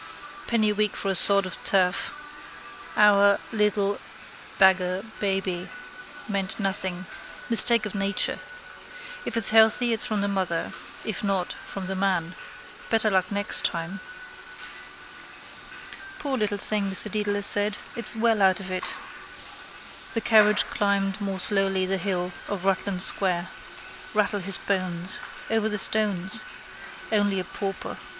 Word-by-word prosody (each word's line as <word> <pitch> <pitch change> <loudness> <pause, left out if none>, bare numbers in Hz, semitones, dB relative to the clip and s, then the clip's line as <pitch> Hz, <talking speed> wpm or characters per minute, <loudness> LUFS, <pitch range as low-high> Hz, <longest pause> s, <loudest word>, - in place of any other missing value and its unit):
Penny 220 -3 +1
a - - -1
week 210 0 0
for 195 - -2
a - - -1
sod 200 +1 +5
of 185 - -8
turf. 185 -1 +2 0.9
Our. 200 -1 +5
Little. 210 -2 0 0.6
Beggar. 185 0 +3 0.2
Baby. 190 -3 -2 0.6
Meant 195 -2 -3
nothing. 190 -2 -2 0.5
Mistake 230 -1 +8
of 210 - -6
nature. 205 0 -1 0.9
If 230 - -4
it's 225 - +2
healthy 225 +2 +4
it's 225 - +1
from 215 -2 -2
the 200 - -1
mother. 185 -4 -2 0.3
If 215 - -4
not 195 -3 -2
from 195 -1 -7
the 190 - -4
man. 185 -3 -1 0.6
Better 220 -1 +1
luck 185 0 0
next 205 +1 0
time. 170 +4 -3 2.2
—Poor 285 -8 -3
little 210 -4 -1
thing, 205 -1 -1
Mr 190 +2 -3
Dedalus 205 -1 -2
said. 205 +1 0 0.2
It's 235 -1 -1
well 225 -1 +1
out 190 -1 +3
of 190 -1 -8
it. 185 0 -3 1.2
The 225 - 0
carriage 210 -2 +4
climbed 200 0 -1
more 195 -1 -3
slowly 195 -1 +2
the 195 +1 -1
hill 180 -1 -2 0.2
of 195 -2 -5
Rutland 190 -1 0
square. 185 -2 0 0.7
Rattle 210 -1 +1
his 195 0 -1
bones. 185 -2 +2 0.3
Over 220 -1 +1
the 210 - -2
stones. 200 -3 +3 0.7
Only 205 -2 +1
a - - -3
pauper. 195 0 -6
200 Hz, 135 wpm, -24 LUFS, 190-210 Hz, 2.2 s, Mistake